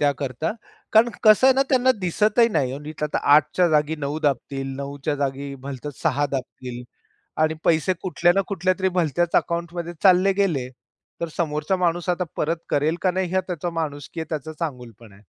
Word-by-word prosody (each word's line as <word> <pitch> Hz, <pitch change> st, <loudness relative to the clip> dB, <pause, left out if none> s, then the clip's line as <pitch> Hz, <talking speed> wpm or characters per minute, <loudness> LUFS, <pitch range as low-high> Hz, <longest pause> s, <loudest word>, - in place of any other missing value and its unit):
त्याकरता. 145 Hz, -, -1 dB, 0.4 s
कारण 225 Hz, +2 st, +6 dB, 0.2 s
कसं 215 Hz, +4 st, +7 dB
आहे 265 Hz, -, +6 dB
ना, 270 Hz, -, +4 dB
त्यांना 260 Hz, -1 st, +4 dB
दिसतही 210 Hz, +6 st, +3 dB
नाही 135 Hz, -, -1 dB
नीट. 150 Hz, +1 st, -9 dB
आता 150 Hz, -, -1 dB, 0.2 s
8च्या 170 Hz, +4 st, +3 dB
जागी 150 Hz, 0 st, +1 dB
9 150 Hz, +1 st, -3 dB
दाबतील, 135 Hz, -1 st, -1 dB
9च्या 140 Hz, +1 st, -3 dB
जागी 140 Hz, 0 st, -3 dB
भलतच 140 Hz, +1 st, -7 dB
6 145 Hz, +2 st, +1 dB
दाबतील 125 Hz, -2 st, -5 dB, 0.6 s
आणि 155 Hz, 0 st, +3 dB
पैसे 165 Hz, +3 st, +3 dB
कुठल्या 175 Hz, -1 st, +2 dB
ना 195 Hz, -, +4 dB
कुठल्यातरी 190 Hz, 0 st, 0 dB
भलत्याच 170 Hz, +1 st, 0 dB
अकाउंटमध्ये 170 Hz, 0 st, -1 dB
चालले 190 Hz, 0 st, +5 dB
गेले. 175 Hz, -10 st, 0 dB, 0.5 s
तर 170 Hz, -, -1 dB
समोरचा 155 Hz, +1 st, 0 dB
माणूस 175 Hz, +1 st, -1 dB
आता 180 Hz, +1 st, +1 dB
परत 165 Hz, +2 st, 0 dB
करेल 150 Hz, +3 st, +1 dB
का 185 Hz, -, +2 dB
नाही. 185 Hz, 0 st, -1 dB
हे 190 Hz, -, +3 dB
त्याचा 175 Hz, -1 st, -3 dB
माणुसकी 145 Hz, 0 st, -6 dB
आहे, 160 Hz, -, -8 dB
त्याचा 155 Hz, 0 st, -4 dB
चांगुलपणा 120 Hz, -, -7 dB
आहे. 100 Hz, -, -20 dB
155 Hz, 170 wpm, -23 LUFS, 140-180 Hz, 0.6 s, कसं